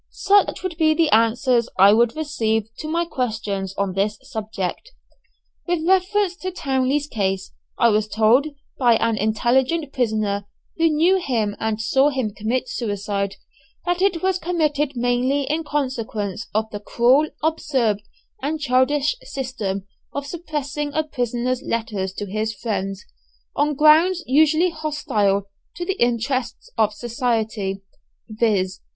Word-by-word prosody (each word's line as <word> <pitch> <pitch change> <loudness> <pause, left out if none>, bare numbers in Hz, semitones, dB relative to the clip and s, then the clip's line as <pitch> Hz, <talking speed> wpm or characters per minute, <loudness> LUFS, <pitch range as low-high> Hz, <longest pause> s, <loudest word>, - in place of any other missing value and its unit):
Such 400 -1 +2
would 360 -4 -4
be 310 -2 +3
the 325 -2 +2
answers 235 +2 +3
I 195 +2 +7
would 235 +3 +3
receive 225 -9 -1
to 310 - -5
my 335 +2 0
questions 215 - -3
on 200 -2 -1
this 205 +2 0
subject. 215 - -5 0.7
With 345 -2 0
reference 380 0 +2
to 370 - -4
Townley's 275 -4 0
case 195 -8 -2 0.3
I 235 - +5
was 215 0 +2
told 225 +7 +3 0.3
by 240 -3 +5
an 230 0 +1
intelligent 255 +8 +1
prisoner, 215 -5 -1 0.3
who 330 0 +4
knew 330 +5 +3
him 230 - -1
and 220 -1 -1
saw 265 +6 +3
him 260 -7 -2
commit 230 +5 -2
suicide, 200 -4 -2 0.5
that 355 0 0
it 370 -4 +1
was 375 -1 +1
committed 300 -5 0
mainly 245 +3 +1
in 305 +4 -1
consequence 230 - -3
of 215 +1 0
the 205 - -5
cruel, 250 +8 +3
absurd 265 -10 +1 0.4
and 305 +4 -2
childish 275 +1 +2
system 220 -8 -4 0.3
of 285 0 -3
suppressing 295 -2 -4
a 315 - +2
prisoner's 250 -3 -2
letters 215 -7 -2
to 205 - -5
his 215 +2 -2
friends, 195 -2 -3 0.5
on 295 0 +1
grounds 320 +5 +5
usually 315 +5 +4
hostile 220 -11 0 0.3
to 350 - -4
the 385 +2 -3
interests 245 +1 -1
of 215 -1 +2
society, 220 -4 -2 0.4
viz. 210 -5 0
250 Hz, 135 wpm, -22 LUFS, 215-305 Hz, 0.7 s, I